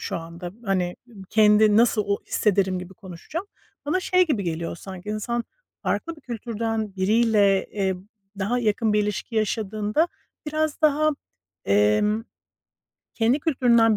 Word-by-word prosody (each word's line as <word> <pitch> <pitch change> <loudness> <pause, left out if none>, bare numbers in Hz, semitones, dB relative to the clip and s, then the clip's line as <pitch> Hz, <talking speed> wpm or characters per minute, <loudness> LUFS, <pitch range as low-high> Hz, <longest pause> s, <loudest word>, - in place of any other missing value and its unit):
şu - - -3
anda. 170 +2 -7
Hani, 180 -3 0 0.3
kendi 210 0 +5
nasıl 230 -2 +4
o 200 0 +1
hissederim 190 -3 +1
gibi 180 +1 -9
konuşacağım. 225 - -7 0.4
Bana 370 +6 +1
şey 365 -1 +3
gibi 250 -10 0
geliyor 170 -1 -3
sanki 190 +1 -9
insan 230 +3 -2 0.4
farklı 335 0 -2
bir - - -16
kültürden 225 -4 -3
biriyle, 205 -1 +3
eee, 195 -2 -1 0.4
daha 205 +5 0
yakın 220 -1 +1
bir 210 0 +3
ilişki 210 +3 -4
yaşadığında 215 - 0 0.4
biraz 310 0 -1
daha, 310 0 +4 0.5
emm 105 - +2 0.9
kendi 235 +4 +2
kültüründen 235 -7 +4
215 Hz, 130 wpm, -24 LUFS, 195-240 Hz, 0.9 s, kendi